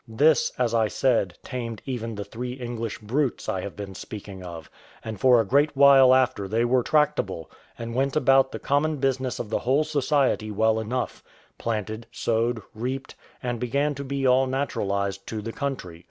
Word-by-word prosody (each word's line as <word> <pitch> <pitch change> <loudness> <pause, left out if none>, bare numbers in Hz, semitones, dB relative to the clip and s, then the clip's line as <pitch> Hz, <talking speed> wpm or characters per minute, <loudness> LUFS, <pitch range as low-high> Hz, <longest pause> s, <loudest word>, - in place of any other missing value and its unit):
This, 140 +6 +3
as 120 -2 +1
I 115 -2 +3
said, 115 -5 +1
tamed 120 -4 -5
even 115 -4 -4
the 100 - -4
three 125 +4 -6
English 120 -3 -5
brutes 125 +5 -1
I 95 - -1
have 100 - -7
been 100 -2 -7
speaking 100 -1 -8
of; 85 -3 -8 0.4
and 110 -3 -5
for 125 -2 +6
a 110 - +2
great 140 +6 +2
while 135 -2 +8
after 120 -6 +1
they 115 +4 +1
were 125 +1 +3
tractable, 125 - 0 0.3
and 115 0 -5
went 135 +2 0
about 135 -3 +4
the - - -4
common 150 +2 0
business 130 -2 -1
of 105 - -6
the - - +1
whole 135 +5 +2
society 145 -6 +1
well 110 +1 +2
enough 120 +3 -3 0.4
planted, 110 0 -3
sowed, 115 -1 0
reaped, 130 +4 -4 0.3
and 120 -2 -2
began 140 +5 0
to 140 0 -6
be 140 0 -2
all 130 +1 +4
naturalised 100 -7 -2
to 110 - -4
the 115 +2 -6
country. 130 -12 -4
120 Hz, 180 wpm, -25 LUFS, 110-135 Hz, 0.4 s, while